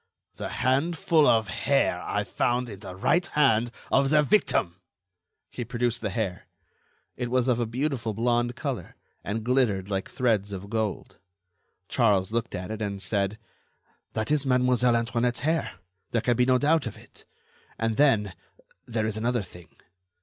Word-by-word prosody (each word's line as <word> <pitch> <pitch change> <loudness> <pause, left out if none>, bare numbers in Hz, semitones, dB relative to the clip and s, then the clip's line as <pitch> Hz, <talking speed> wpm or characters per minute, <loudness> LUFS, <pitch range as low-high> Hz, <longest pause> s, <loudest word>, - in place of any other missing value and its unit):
"The - - -4
handful 155 +3 +2
of 110 -2 +4
hair 90 - +1
I - - -1
found 120 0 -1
in 100 - -9
the 95 -3 -8
right 170 - +2
hand 120 -8 +2 0.2
of 135 0 +3
the 150 0 +4
victim." 140 - +1 0.7
He 120 - -4
produced 120 0 -1
the 110 - -1
hair; 95 -3 -3 0.7
it 125 -1 -3
was 125 0 +1
of 125 -2 +2
a 120 - 0
beautiful 120 -3 -2
blond 120 +1 +1
color, - - -5 0.3
and 110 +2 -3
glittered 110 -6 +1
like 95 -1 -2
threads 105 -5 0
of 100 +2 -7
gold. 110 -3 -3 0.7
Charles 105 -6 +2
looked 115 0 -2
at 90 +3 -5
it, 110 0 -5
and 100 -2 -3
said: 100 +2 -1 0.8
"That 110 +5 -2
is 150 -2 +2
Mademoiselle 125 -2 +3
Antoinette's 115 +1 0
hair. 160 +4 0 0.4
There 115 - 0
can 120 +2 +2
be 125 +2 +2
no 130 -1 +5
doubt 150 +1 +2
of 110 - -7
it. - - -14 0.5
And, 115 -1 -1
then, 110 -9 +3 0.5
there 110 -2 -1
is 110 -1 -2
another 120 0 0
thing. 90 -2 -14
115 Hz, 160 wpm, -26 LUFS, 105-125 Hz, 0.8 s, no